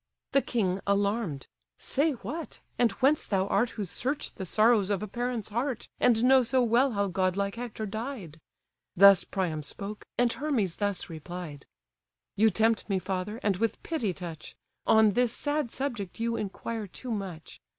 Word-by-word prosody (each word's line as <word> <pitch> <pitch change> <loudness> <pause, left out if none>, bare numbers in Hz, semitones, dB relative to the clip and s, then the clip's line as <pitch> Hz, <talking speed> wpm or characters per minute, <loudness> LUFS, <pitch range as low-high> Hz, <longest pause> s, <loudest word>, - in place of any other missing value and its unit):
The 275 - +4
king, 195 -8 0
alarm'd: 200 - 0 0.3
"Say 295 +3 +1
what, 310 +7 -6 0.2
and 240 -2 +4
whence 295 +3 +4
thou 190 -2 +1
art 240 - +2
Who 210 - -1
search 255 - -3
the 190 - -6
sorrows 215 0 +4
of 200 -1 0
a - - -3
parent's 240 0 -3
heart, 240 +3 -2
And 235 -2 +4
know 260 +1 +6
so 255 +1 +2
well 240 +3 +3
how 200 -1 +1
godlike 195 +1 0
Hector 230 -2 -5
died?" 215 - -6 0.6
Thus 200 +1 +8
Priam 175 -6 -2
spoke, 200 +8 -7
and 240 -1 +3
Hermes 240 - -1
thus 205 -2 -2
replied: 160 -2 -8 0.7
"You 220 +2 +5
tempt 220 +2 +1
me, 195 - +2
father, 190 +4 -3
and 200 -3 +2
with 225 +1 -1
pity 255 - -1
touch: 170 -4 -8 0.3
On 220 -1 +6
this 245 +2 +1
sad 290 -3 -1
subject 235 -9 -4
you 230 0 0
inquire 215 +1 -4
too 245 +6 -7
much. 190 -7 -6
215 Hz, 160 wpm, -28 LUFS, 190-240 Hz, 0.7 s, Thus